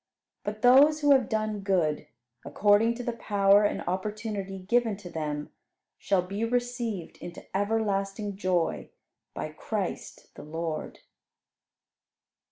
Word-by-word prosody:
But 210 +1 -5
those 285 +5 +6
who 290 -1 +4
have 260 -3 +4
done 215 -2 -1
good, 170 -7 0 0.4
according 205 +10 +3
to 245 - -6
the 240 - -2
power 205 -2 +3
and - - -1
opportunity 200 +1 -3
given 220 +2 +1
to 185 -4 -10
them, 150 -2 -4 0.5
shall 190 -2 +1
be 200 +4 -4
received 240 -5 -2
into 175 0 -9
everlasting 205 -1 -1
joy 185 -3 -1 0.5
by - - -4
Christ - - -5
the - - -11
Lord. 160 +1 -5
205 Hz, 120 wpm, -28 LUFS, 185-225 Hz, 0.5 s, those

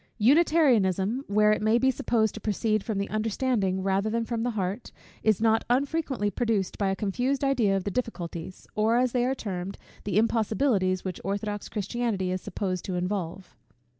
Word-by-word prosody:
Unitarianism, 245 - +3
where 210 +1 +4
it 215 - +1
may 215 +2 +3
be 265 +2 +3
supposed 225 -3 0
to 220 - -8
proceed 215 0 0
from 220 -3 -3
the 200 0 -1
understanding 215 -3 0
rather 195 +2 +1
than 230 +1 -1
from 230 -1 -2
the 245 - 0
heart, 195 +4 -3 0.3
is 215 -3 +2
not 225 0 +3
unfrequently 265 -4 0
produced 215 -3 -1
by 200 -2 +1
a 190 - 0
confused 245 +8 -1
idea 240 -8 +2
of 190 - -3
the 200 - -3
difficulties, 185 -6 -5
or, 220 +2 +2
as 250 0 +2
they 245 0 +1
are 265 - 0
termed, 195 -4 -5 0.3
the 200 -2 -1
impossibilities 215 -4 +1
which 185 -2 -4
orthodox 205 +2 -3
Christianity 205 -2 -2
is 185 0 -2
supposed 185 -3 -3
to 185 - -3
involve. 180 0 -3
215 Hz, 175 wpm, -27 LUFS, 195-240 Hz, 0.3 s, where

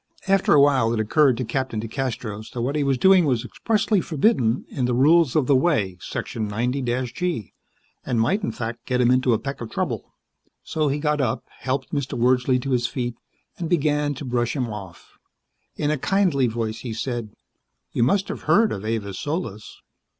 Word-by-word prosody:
After 195 -5 +4
awhile 135 -5 +4
it - - -2
occurred 130 +4 +3
to 130 - -2
Captain 120 -1 -2
DeCastros 115 -2 -4
that 120 - -3
what 135 +4 -1
he 150 - +1
was 135 -2 +1
doing 190 +5 +6
was 125 -4 0
expressly 210 - 0
forbidden 140 - +1
in 130 - -2
the 125 -1 0
Rules 150 +2 +4
of 150 -4 +3
the 140 - +4
Way, 110 - +1
Section 110 -2 -4
90 120 +6 -1 0.3
G, 170 - -3 0.5
and 120 - -1
might, 190 - +2
in 205 - -2
fact, 115 0 -6
get 125 -1 0
him 125 0 +4
into 130 0 +3
a - - +3
peck 135 +2 -6
of 115 - -5
trouble. - - -3 0.5
So 155 -1 -1
he 140 +1 0
got 150 -1 0
up, 115 -4 -1 0.2
helped 130 +1 -3
Mr. 140 -3 -2
Wordsley 125 +1 +3
to 135 - -3
his 120 -1 +2
feet, 120 -1 -3 0.5
and 170 -2 -3
began 150 -3 +1
to 140 - -7
brush 120 0 -1
him 125 -5 -2
off. 95 -4 -11 0.6
In 150 0 0
a 155 - -1
kindly 175 -7 +2
voice 110 -1 -3
he 120 -3 -5
said, 115 -2 -4 0.6
"You - - 0
must 195 +11 +2
have - - -5
heard 225 +1 +5
of 100 - -4
Avis 110 -3 -3
Solis." 145 - -5
130 Hz, 190 wpm, -23 LUFS, 115-150 Hz, 0.6 s, doing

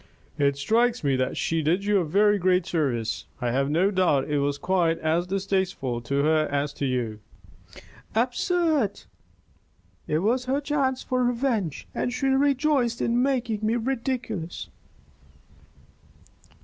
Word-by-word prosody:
"It 140 -1 +2
strikes 230 +10 +1
me 140 -2 +2
that 130 0 -1
she 165 0 0
did 175 +6 +1
you 205 -1 +3
a - - +1
very 205 +5 +3
great 180 -1 +2
service. 120 -9 -1
I 120 -2 -1
have 135 +3 0
no 175 +7 +2
doubt 180 -8 +2
it 145 - +2
was 140 0 0
quite 175 -1 +1
as 165 +3 0
distasteful 190 -10 -1
to 140 +4 -1
her 155 0 +2
as 145 0 -1
to 140 - +1
you." 120 -4 -2 1.0
"Absurd! 260 - +1 1.0
It 150 - +1
was 235 +9 +1
her 265 +2 0
chance 275 -3 -1
for 255 0 0
revenge, 240 - -1
and 245 - -1
she 250 +2 -3
rejoiced 270 -3 +2
in 235 +1 +1
making 250 -5 0
me 220 +2 +1
ridiculous." 235 -7 -3
195 Hz, 140 wpm, -25 LUFS, 150-245 Hz, 1.0 s, you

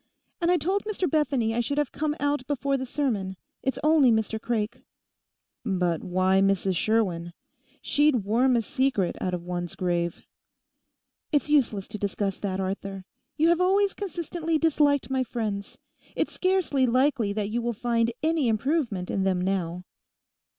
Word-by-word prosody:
And 340 - +2
I 355 - +4
told 385 +4 0
Mr 405 -4 -1
Bethany 270 -7 +1
I 235 - 0
should 280 +5 -1
have 295 -3 0
to - - -16
come 300 0 0
out 285 -3 -1
before 280 -1 0
the 260 -1 -3
sermon: 210 -10 -2 0.2
it's 265 - -1
only 305 -4 +5
Mr 220 -1 0
Craik.' 225 -3 -2 0.8
'But 180 -6 0
why 185 +1 +2
Mrs 195 -1 +2
Sherwin? 175 -5 0 0.5
She'd 290 -6 +3
worm 245 +6 +3
a 230 - +2
secret 260 -8 0
out 180 -1 -1
of 175 - -7
one's 175 -1 -4
grave.' 175 -2 -1 1.1
'It's 295 -1 +1
useless 235 -10 +2
to 215 - -6
discuss 200 -1 -2
that, 190 -2 -2
Arthur; 195 0 -4 0.3
you 320 +2 +4
have 340 +1 +3
always 390 +2 +3
consistently 340 -4 -2
disliked 290 -4 +2
my 260 -1 +1
friends. 215 -5 -4 0.4
It's - - -1
scarcely 365 -8 +1
likely 255 -3 +2
that 210 0 -2
you 240 +2 0
would 235 -2 -2
find 235 -1 +1
any 315 -4 +2
improvement 225 - 0
in 195 - 0
them 190 -1 +1
now. 180 -2 -2
235 Hz, 160 wpm, -26 LUFS, 195-290 Hz, 1.1 s, only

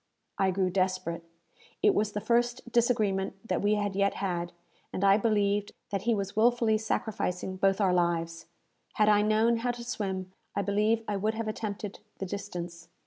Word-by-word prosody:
I 195 - +3
grew 185 0 +1
desperate. 185 -2 -1 0.6
It 415 - +6
was 215 - 0
the 210 - -1
first 240 +1 0
disagreement 215 -6 +1
that - - 0
we 205 +1 +3
had 205 -2 -1
yet 200 0 +2
had, 175 -3 -2 0.4
and 185 - -3
I 195 0 +7
believed 205 -2 +1 0.2
that 195 -2 -1
he 230 - +4
was 200 -1 -3
wilfully 230 -1 +3
sacrificing 190 -4 -2
both 195 +1 +2
our 190 -3 +3
lives. 170 -2 0 0.5
Had 215 0 +3
I 210 -1 +5
known 220 +2 +3
how 240 +2 -1
to 240 0 -3
swim, 190 -6 -3 0.2
I 200 - 0
believe 210 +3 +1
I 205 - -1
would 215 +3 0
have 225 0 -3
attempted 210 -1 -4 0.2
the 195 - -4
distance. 175 -3 -6
200 Hz, 175 wpm, -29 LUFS, 190-220 Hz, 0.6 s, I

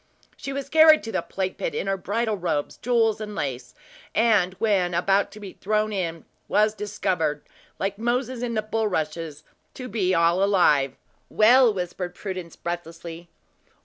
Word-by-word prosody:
"She 275 - -6
was 275 0 -4
carried 315 +1 +6
to 225 - -5
the - - 0
plague 190 -1 -4
pit - - -3
in - - -2
her 195 0 0
bridal 215 +4 -1
robes, 170 -6 -2
jewels 225 -3 +1
and 210 -1 -6
lace; 130 -5 -4 0.4
and, 210 -5 +3
when 190 -4 +1
about 195 +3 +2
to 215 - -11
be 200 -3 -9
thrown 215 +1 -1
in, 170 -4 -3 0.2
was 210 0 +3
discovered, 185 -7 -2 0.3
like 195 +1 -3
Moses 245 +1 -1
is 240 -2 -2
the 215 - 0
bulrushes, 165 -8 -2 0.3
to 255 - -7
be 185 -6 0
all 170 +3 +3
alive." 150 -9 +3 0.3
"Well," 240 +3 +6
whispered 180 -2 -4
Prudence, 185 -4 -6
breathlessly. 170 0 -7
195 Hz, 155 wpm, -24 LUFS, 175-220 Hz, 0.4 s, carried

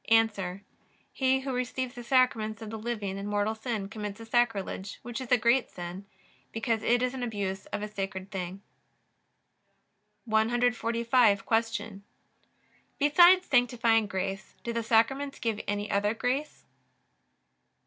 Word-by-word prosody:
A. 210 -5 +2 0.5
He 265 0 +2
who 265 -1 -3
receives 250 0 -2
the 245 -3 -8
Sacraments 235 -4 +2
of 215 - -7
the 220 - -5
living 210 -4 -3
in 200 - -5
mortal 205 +1 0
sin 220 -3 -4
commits 210 0 -6
a 225 - -9
sacrilege, 225 -5 -1
which 240 +2 -5
is 255 - -8
a 250 - +7
great 235 +3 +2
sin, 180 +3 -8 0.4
because 225 -1 -1
it 240 +2 +2
is 255 0 0
an 260 - -5
abuse 200 -5 -3
of 205 - -4
a - - -2
sacred 195 -1 -5
thing. 190 0 -5 1.6
145. 230 -1 +2
Q. 225 -3 -1 1.0
Besides 350 +6 +6
sanctifying 235 -3 +3
grace 195 0 -4
do 235 - -3
the 230 - -1
Sacraments 255 +5 +2
give 225 -3 -2
any 205 0 -2
other 205 +2 +1
grace? 265 +6 -2
225 Hz, 140 wpm, -29 LUFS, 205-245 Hz, 1.6 s, a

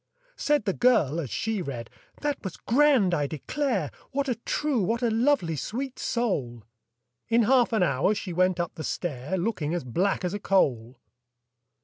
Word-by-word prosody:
Said 295 -7 +1
the 195 - +1
girl 180 - +3
as 145 -7 -4
she 220 - -2
read, 125 -8 -5 0.3
"That 290 -1 -2
was 190 -4 -5
grand, 255 -7 +3
I 145 -4 +1
declare! 190 - -2 0.2
What 280 +1 -1
a 255 - +2
true, 255 +2 -1
what 230 +6 0
a 235 - +2
lovely, 225 - +2
sweet 250 - -4
soul!" 140 - -2 0.7
In 230 0 +4
half 250 +2 +4
an 220 -5 +2
hour 145 +6 +2
she 190 -3 -5
went 185 +1 +2
up 175 - -2
the 160 - -7
stair, 155 +1 -3
Looking 175 -5 -1
as 175 - -2
black 180 - 0
as 180 - -2
a 205 - -3
coal! 130 - +1
195 Hz, 170 wpm, -26 LUFS, 155-240 Hz, 0.7 s, In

